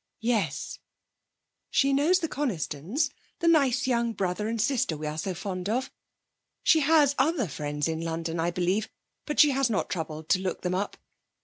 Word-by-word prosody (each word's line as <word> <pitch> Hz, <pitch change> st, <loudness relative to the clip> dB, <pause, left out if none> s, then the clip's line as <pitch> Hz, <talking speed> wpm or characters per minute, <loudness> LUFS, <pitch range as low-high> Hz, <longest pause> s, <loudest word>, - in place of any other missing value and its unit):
'Yes. 215 Hz, -, -1 dB, 0.9 s
"_She 275 Hz, -1 st, +3 dB
knows 300 Hz, +7 st, +4 dB
the 325 Hz, -, 0 dB
Conistons; 240 Hz, -, -2 dB, 0.3 s
the 340 Hz, -, -1 dB
nice 275 Hz, -7 st, +4 dB
young 235 Hz, -2 st, +1 dB
brother 195 Hz, +1 st, -2 dB
and 230 Hz, 0 st, -2 dB
sister 225 Hz, -, +1 dB
we 155 Hz, -, -6 dB
are 150 Hz, +1 st, -3 dB
so 185 Hz, +3 st, -3 dB
fond 185 Hz, +1 st, -4 dB
of. 250 Hz, +4 st, -1 dB, 0.7 s
She 320 Hz, -, +5 dB
has 295 Hz, -1 st, +4 dB
other 270 Hz, -, +2 dB
friends 150 Hz, 0 st, -3 dB
in 160 Hz, 0 st, -2 dB
London, 165 Hz, 0 st, -3 dB
I 165 Hz, +1 st, +1 dB
believe, 185 Hz, +4 st, 0 dB, 0.4 s
but 300 Hz, -, -2 dB
she 300 Hz, -2 st, +7 dB
has 270 Hz, -2 st, +1 dB
not 210 Hz, -, -1 dB
troubled 160 Hz, -3 st, -4 dB
to 185 Hz, -, +4 dB
look 185 Hz, -1 st, -3 dB
them 180 Hz, 0 st, -1 dB
up. 195 Hz, +3 st, -2 dB
210 Hz, 175 wpm, -27 LUFS, 165-275 Hz, 0.9 s, she